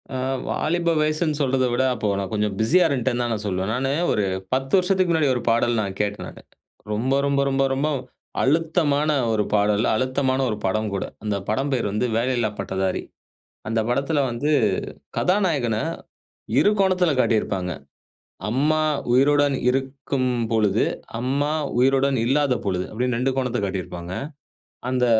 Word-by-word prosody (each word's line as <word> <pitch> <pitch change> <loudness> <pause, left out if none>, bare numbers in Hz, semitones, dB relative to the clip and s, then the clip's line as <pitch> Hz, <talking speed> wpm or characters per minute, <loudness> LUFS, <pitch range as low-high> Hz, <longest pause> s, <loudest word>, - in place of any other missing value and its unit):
அ - - -1 0.3
வாலிப 170 +2 0
வயசுன்னு 155 0 0
சொல்றத 130 -1 +2
விட 130 - +2
அப்போ 110 -3 -2
நான் 95 0 -4
கொஞ்சம் 105 -1 0
பிஸியா 170 +11 +4
இருந்டேன்னு 125 -3 0
தான் 120 - -1
நான் 105 -1 -4
சொல்லுவேன். 95 +2 -1
நானு 135 +2 0 0.2
ஒரு 105 - +1 0.3
10 135 +1 -1
வருஷத்துக்கு 185 -1 +1
முன்னாடி 155 -4 +2
ஒரு 120 - -2
பாடல் 115 0 +2
நான் 95 -1 -4
கேட்டேன் 105 0 -3
நானு. - - -11 0.5
ரொம்ப 120 +6 0
ரொம்ப 140 0 +2
ரொம்ப 135 0 +1
ரொம்ப 140 +3 0 0.6
அழுத்தமான 155 0 +2 0.2
ஒரு 105 -1 +2
பாடல், 105 +1 +2
அழுத்தமான 130 +2 0
ஒரு 105 - -2
படம் 110 +3 0
கூட. 100 - -2 0.2
அந்த 105 -1 -1
படம் 135 +6 0
பேர் 115 -5 0
வந்து 105 +4 0
வேலையில்லா 120 -2 +1
பட்டதாரி 95 0 -1 0.7
அந்த 115 0 0
படத்ல 140 +5 +1
வந்து 140 +6 -2 0.7
கதாநாயகன 170 - +1 0.8
இரு 205 - +4
கோணத்ல 185 -4 +3
காட்டியிருப்பாங்க. 95 -6 +1 0.8
அம்மா 150 +6 +2 0.3
உயிருடன் 145 +2 +4
இருக்கும் 135 0 -1 0.2
பொழுது, 105 -2 +2 0.4
அம்மா 140 +4 0 0.3
உயிருடன் 135 +1 +3
இல்லாத 135 0 +2
பொழுது 90 -2 0
அப்டின்னு 125 +2 -1
2 130 +2 +1
கோணத்த 125 -2 0
காட்டியிருப்பாங்க. 90 -2 -5 0.8
அந்த 125 -1 +1
130 Hz, 145 wpm, -23 LUFS, 110-145 Hz, 0.8 s, பிஸியா